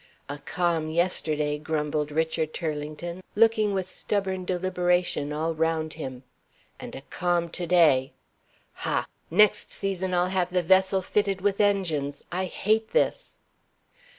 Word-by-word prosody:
"A 145 +1 -6
calm 165 -1 -1
yesterday," 155 -3 0
grumbled 150 -1 -2
Richard 160 0 -1
Turlington, 155 +2 -4
looking 220 -1 +4
with 190 -2 -1
stubborn 190 -2 -2
deliberation 180 -4 0
all 160 +2 -1
round 160 0 0
him. 130 -5 -7 0.6
"And - - -8
a - - -7
calm 175 -1 0
to 175 +1 -4
day. 155 -7 +4 0.7
Ha! - - 0 0.2
next 210 +4 +4
season 190 -2 -1
I'll 180 +1 +2
have 185 -1 0
the 180 -1 +1
vessel 190 +2 +3
fitted 195 -1 0
with 200 +1 +1
engines. 160 -9 0
I 185 +2 -1
hate 215 +4 0
this!" - - 0
175 Hz, 130 wpm, -26 LUFS, 155-190 Hz, 0.7 s, looking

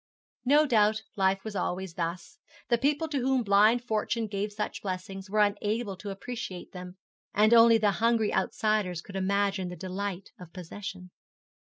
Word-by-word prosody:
No 295 +4 +5
doubt 215 -4 +2
life 195 0 +1
was 220 -2 -6
always 185 -1 -3
thus. 175 - -5 0.3
The 235 -2 +3
people 295 +4 +1
to 285 -3 -1
whom 260 0 +1
blind 215 +4 +4
fortune 225 0 -1
gave 205 0 -3
such 210 +1 -4
blessings 190 0 -5
were 210 +1 +2
unable 205 +1 0
to 200 +2 -7
appreciate 195 -2 -6
them, 180 0 -9 0.4
and 215 +3 +5
only 230 0 +7
the 210 -2 +2
hungry 230 -2 +2
outsiders 190 -3 0
could 195 - -11
imagine 195 0 0
the 180 - -7
delight 190 0 -5
of 175 -2 -12
possession. 185 0 -8
205 Hz, 160 wpm, -28 LUFS, 190-225 Hz, 0.4 s, only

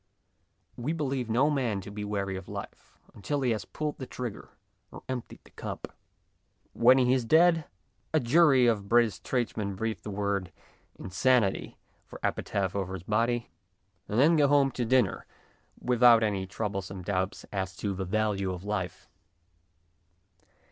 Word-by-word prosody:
We 130 +7 -2
believe 135 -6 -2
no 130 +7 +3
man 125 -8 0
to 100 - -9
be 105 0 -5
weary 100 -2 -2
of 95 - -8
life - - -9 0.2
until 140 +8 -3
he 125 -2 +1
has 110 - -2
pulled 150 -1 -4
the 130 - -6
trigger 125 -4 -6 0.4
or - - -11
emptied 130 -2 -6
the - - -20
cup. - - -7 0.8
When 125 +3 +6
he 125 -1 +4
is 130 -2 +1
dead 165 +5 +4 0.5
a - - +3
jury 135 0 +5
of 105 -4 +1
British 120 -3 +3
tradesmen 110 -5 -2
breathe 110 +3 -3
the - - -7
word 100 -3 -2 0.2
" - - -38
insanity 105 +2 +1
" - - -39
for - - -11
epitaph 95 -1 -1
over 95 -1 -2
his 90 - -8
body, 115 +4 0 0.6
and 105 - 0
then 160 +5 +5
go 145 -2 +5
home 140 -1 +4
to 125 - -2
dinner 130 +2 +1 0.5
without 120 -2 +5
any 100 -3 -1
troublesome 95 -2 -4
doubts 95 +1 -2
as 95 -2 -3
to 100 -2 -3
the 95 0 -3
value 100 -1 0
of 90 0 -6
life. 100 -4 -4
110 Hz, 160 wpm, -28 LUFS, 100-130 Hz, 0.8 s, When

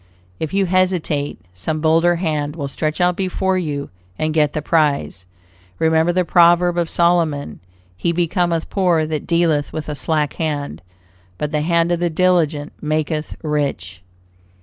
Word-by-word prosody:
If 160 - -3
you 195 0 +1
hesitate, 180 -5 0
some 155 - -3
bolder 165 +2 +3
hand 155 -4 -2
will 145 -4 -4
stretch 155 +4 -3
out 180 0 +3
before 190 0 -1
you 145 -5 -4 0.3
and 155 0 -1
get 150 -2 +2
the 150 - -2
prize. 145 - 0 0.5
Remember 160 +1 +2
the 180 0 +1
proverb 175 +1 +4
of 170 -2 0
Solomon: 165 - +1 0.4
"He 105 - -1
becometh 170 -1 0
poor 175 -5 +2
that 155 -2 -4
dealeth 165 -4 +1
with 155 -1 -5
a 150 - -3
slack 150 0 -1
hand; 145 - -3 0.6
but 150 - -3
the 150 -1 0
hand 170 +1 +2
of 175 - +1
the 175 0 +1
diligent 160 -4 +1
maketh 155 0 -2
rich." 140 - -2
160 Hz, 150 wpm, -19 LUFS, 150-175 Hz, 0.6 s, proverb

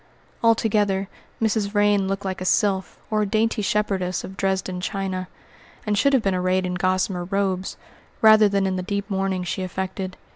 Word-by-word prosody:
Altogether, 210 -4 +2 0.3
Mrs. 220 -2 +1
Vrain 205 -1 +2
looked 195 +1 -3
like 190 -1 -3
a - - -3
sylph 190 0 +1
or 215 0 +2
a - - +2
dainty 220 +2 +1
shepherdess 195 -3 -1
of 190 - -8
Dresden 190 -2 -1
china, 185 -1 -3 0.6
and 210 -1 +1
should 280 +7 +3
have 260 -4 +3
been 195 - +1
arrayed 185 0 +1
in 180 - -2
gossamer 185 0 0
robes, 190 -1 -1 0.4
rather 215 -1 +7
than 200 -1 +1
in 190 -1 -1
the - - -2
deep 200 +2 -3
mourning 190 -1 -1
she 180 +2 -3
affected. 185 +1 -4
195 Hz, 175 wpm, -23 LUFS, 185-205 Hz, 0.6 s, rather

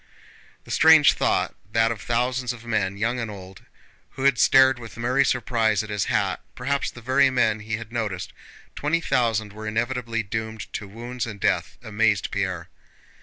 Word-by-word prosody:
The - - -11
strange 160 -2 +6
thought - - 0 0.2
that 115 0 +3
of 115 - -5
the - - -12
thousands 125 +1 0
of 120 -1 -13
men, 100 -4 -1
young 120 +4 -1
and 115 -2 -3
old, 95 -2 -10 0.5
who 130 - -6
had 140 -4 +3
stared 130 +1 +5
with 115 -2 -11
merry 125 +4 +2
surprise 110 -6 +1
at 110 - -8
his 105 -1 -1
hat - - 0
(perhaps 140 +3 -1
the 120 - -12
very 130 +2 +4
men 115 -4 +1
he 110 +1 -4
had 115 0 -10
noticed), 105 -6 -4 0.4
twenty 150 +3 0
thousand 110 -8 0
were 110 +1 -7
inevitably 115 +1 -2
doomed 110 +1 -5
to 105 - -5
wounds 120 +4 -5
and 105 -3 -8
death 90 -2 0
amazed 110 -2 +1
Pierre. 95 -4 -2
115 Hz, 175 wpm, -24 LUFS, 105-125 Hz, 0.5 s, strange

